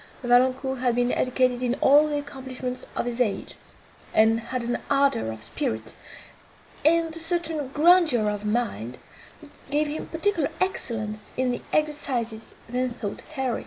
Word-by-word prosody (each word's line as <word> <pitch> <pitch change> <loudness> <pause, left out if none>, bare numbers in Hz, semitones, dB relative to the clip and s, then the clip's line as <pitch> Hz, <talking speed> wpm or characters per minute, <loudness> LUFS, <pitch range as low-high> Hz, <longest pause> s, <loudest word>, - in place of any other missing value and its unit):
Valancourt 255 +2 +3
had 245 -2 +1
been 245 0 +2
educated 255 -1 +1
in 250 0 +1
all 295 +3 +5
the 295 -1 -1
accomplishments 260 -3 -6
of - - -1
his 240 0 -2
age, 210 -5 -1 0.6
and 220 +1 +5
had 235 +2 -4
an 240 +1 -1
ardour 275 - +2
of 110 -1 -7
spirit, 110 0 -3 0.9
and 330 +1 +3
a - - -3
certain 325 -3 -1
grandeur 305 -5 +4
of 205 0 -2
mind, 210 - -2 0.4
that 300 -2 -14 0.2
gave 295 +2 +2
him 295 +2 -4
particular 330 -2 0
excellence 215 - -2
in 255 -1 +1
the 245 - -3
exercises 255 -7 -1
then 250 +2 -1
thought 225 -4 -5
heroic. 260 -4 -1
255 Hz, 150 wpm, -25 LUFS, 235-295 Hz, 0.9 s, all